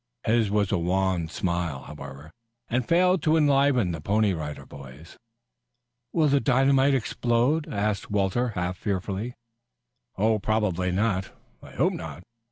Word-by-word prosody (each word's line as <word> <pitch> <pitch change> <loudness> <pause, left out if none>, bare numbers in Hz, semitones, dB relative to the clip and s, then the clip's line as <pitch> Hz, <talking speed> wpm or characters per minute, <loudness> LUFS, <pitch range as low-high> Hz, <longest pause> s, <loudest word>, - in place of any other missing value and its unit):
His 110 -2 +2
was 100 -2 +1
a 100 - +1
wan 90 -1 0
smile, 85 -5 -2
however, 70 +1 -10 0.4
and 120 0 -1
failed 180 +1 +3
to 155 +2 +3
enliven 140 - +3
the 80 -3 -5
Pony 105 +3 +2
Rider 75 -3 -6
Boys. 70 +4 -12 1.0
"Will 160 -3 +2
the 140 0 +3
dynamite 135 +1 +3
explode?" 120 +5 0
asked 105 -1 -2
Walter 105 +4 +1
half 90 +1 -2
fearfully. 100 +4 -3 0.8
"Probably 105 -3 +1
not. 95 0 0 0.3
I - - -13
hope - - +1
not. 90 - -7
105 Hz, 130 wpm, -26 LUFS, 90-125 Hz, 1.0 s, failed